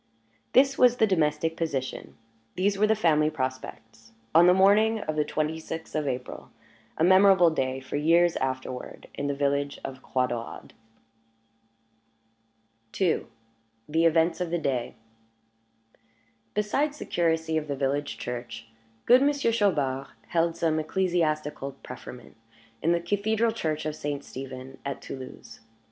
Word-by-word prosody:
This 270 Hz, +1 st, +4 dB
was 245 Hz, -1 st, +5 dB
the 220 Hz, -, +4 dB
domestic 160 Hz, -4 st, +1 dB
position, 140 Hz, -6 st, -4 dB, 0.4 s
these 200 Hz, +2 st, +1 dB
were 210 Hz, +2 st, +3 dB
the 220 Hz, -, +3 dB
family 155 Hz, -6 st, +3 dB
prospects, 115 Hz, -5 st, -6 dB, 0.2 s
on 170 Hz, +2 st, +7 dB
the -, -, +8 dB
morning 210 Hz, +4 st, +4 dB
of 155 Hz, -4 st, -3 dB
the 150 Hz, -, +2 dB
twenty 155 Hz, +1 st, -2 dB
sixth 160 Hz, 0 st, -7 dB
of 155 Hz, -2 st, -1 dB
April 125 Hz, -1 st, -5 dB, 0.5 s
a -, -, +1 dB
memorable 185 Hz, -1 st, +6 dB
day, 130 Hz, -3 st, -1 dB
for 130 Hz, +2 st, -5 dB
years 170 Hz, +3 st, +3 dB
afterward, 130 Hz, -1 st, -4 dB
in 140 Hz, -, -3 dB
the 140 Hz, -, -1 dB
village 140 Hz, 0 st, -1 dB
of 130 Hz, -1 st, -7 dB
Croix 130 Hz, -1 st, 0 dB
Daurade. 120 Hz, -2 st, -6 dB, 2.3 s
II. 185 Hz, -4 st, +1 dB, 0.6 s
THE 160 Hz, +2 st, +2 dB
EVENTS 165 Hz, +1 st, +3 dB
OF 180 Hz, -, -1 dB
THE 175 Hz, -, 0 dB
DAY 130 Hz, -6 st, -2 dB, 1.6 s
Besides 275 Hz, +9 st, 0 dB
the -, -, -7 dB
curacy 160 Hz, -1 st, 0 dB
of 155 Hz, -1 st, -1 dB
the 140 Hz, -, -2 dB
village 140 Hz, +1 st, -2 dB
church, 120 Hz, -1 st, -6 dB, 0.4 s
good 250 Hz, +2 st, +6 dB
Monsieur 280 Hz, -3 st, +2 dB
Chaubard 145 Hz, -, 0 dB, 0.2 s
held 170 Hz, -1 st, +1 dB
some 160 Hz, -2 st, +1 dB
ecclesiastical 155 Hz, -5 st, -1 dB
preferment 125 Hz, -2 st, -10 dB, 0.5 s
in 165 Hz, -, +2 dB
the 170 Hz, -, +2 dB
cathedral 215 Hz, +5 st, +1 dB
church 155 Hz, -9 st, -3 dB
of 155 Hz, -1 st, -2 dB
St. 145 Hz, -2 st, -4 dB
Stephen 130 Hz, 0 st, -9 dB
at 140 Hz, -1 st, -4 dB
Toulouse. 130 Hz, -3 st, -10 dB
155 Hz, 140 wpm, -27 LUFS, 135-185 Hz, 2.3 s, the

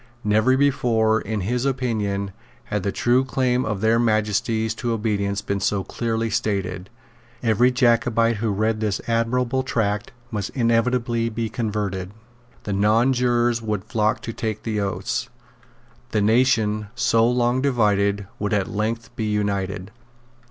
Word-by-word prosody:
Never 110 Hz, +5 st, +3 dB
before, 115 Hz, -5 st, +2 dB
in 110 Hz, 0 st, -3 dB
his 120 Hz, +6 st, -1 dB
opinion, 110 Hz, -7 st, -1 dB, 0.3 s
had 105 Hz, -, -3 dB
the 100 Hz, +1 st, -1 dB
true 120 Hz, +6 st, +2 dB
claim 130 Hz, -1 st, 0 dB
of 105 Hz, -3 st, -3 dB
their 110 Hz, +1 st, +3 dB
Majesties 110 Hz, 0 st, +1 dB
to 120 Hz, -2 st, -1 dB
obedience 100 Hz, -3 st, -1 dB
been 100 Hz, 0 st, -2 dB
so 100 Hz, 0 st, 0 dB
clearly 115 Hz, +2 st, -2 dB
stated. 100 Hz, -4 st, -2 dB, 0.5 s
Every 115 Hz, +2 st, +4 dB
Jacobite 120 Hz, -2 st, +2 dB
who 110 Hz, +2 st, -1 dB
read 110 Hz, +2 st, 0 dB
this 105 Hz, -3 st, -1 dB
admirable 120 Hz, +3 st, +1 dB
tract 105 Hz, -5 st, -1 dB, 0.2 s
must 105 Hz, -4 st, -3 dB
inevitably 115 Hz, -1 st, +1 dB
be 115 Hz, 0 st, -3 dB
converted. 100 Hz, -5 st, -3 dB, 0.5 s
The 100 Hz, -, -3 dB
nonjurors 120 Hz, +3 st, +2 dB
would 105 Hz, -4 st, -2 dB
flock 110 Hz, -1 st, 0 dB
to 115 Hz, -, -5 dB
take 110 Hz, -2 st, -4 dB
the 110 Hz, -2 st, -2 dB
oaths. 100 Hz, -1 st, -2 dB, 0.8 s
The 105 Hz, -, 0 dB
nation, 110 Hz, -2 st, +2 dB
so 115 Hz, -1 st, +3 dB
long 125 Hz, +1 st, +1 dB
divided, 100 Hz, -6 st, +1 dB
would 105 Hz, +1 st, -1 dB
at 100 Hz, -2 st, 0 dB
length 115 Hz, +3 st, -3 dB
be 110 Hz, -, -2 dB
united. 100 Hz, -2 st, -2 dB
110 Hz, 140 wpm, -23 LUFS, 105-120 Hz, 0.8 s, Every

